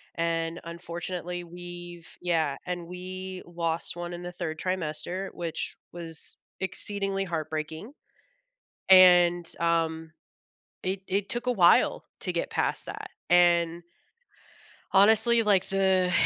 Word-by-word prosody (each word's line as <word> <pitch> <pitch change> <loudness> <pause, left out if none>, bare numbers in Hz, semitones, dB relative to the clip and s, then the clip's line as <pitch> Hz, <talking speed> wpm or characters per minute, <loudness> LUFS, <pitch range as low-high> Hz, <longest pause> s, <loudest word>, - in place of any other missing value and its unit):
And 165 0 -1
unfortunately, 175 +1 -5
we've 175 -1 -10
Yeah, 160 -5 +1
and 175 -1 -4
we 185 +1 -7
lost 170 -1 -3
1 175 0 -5
in 175 0 -7
the 175 - -5
3rd 160 -3 -5
trimester, 185 +1 -3
which 170 -2 -4 0.2
was 165 -2 -5 0.2
exceedingly 195 0 0
heartbreaking. 160 - -4 1.0
And, 175 -2 +7
um, 165 -1 0 0.7
it 190 +1 -2
it 200 +1 -1
took 240 +1 -3
a 250 - +3
while 180 -7 +4 0.2
to - - -2
get - - -2
past - - -1
that. - - -7 0.2
And 175 -1 +4 1.1
honestly, 220 +4 +6
like, 200 -3 +2
the 190 -2 +2
175 Hz, 115 wpm, -27 LUFS, 170-190 Hz, 1.1 s, And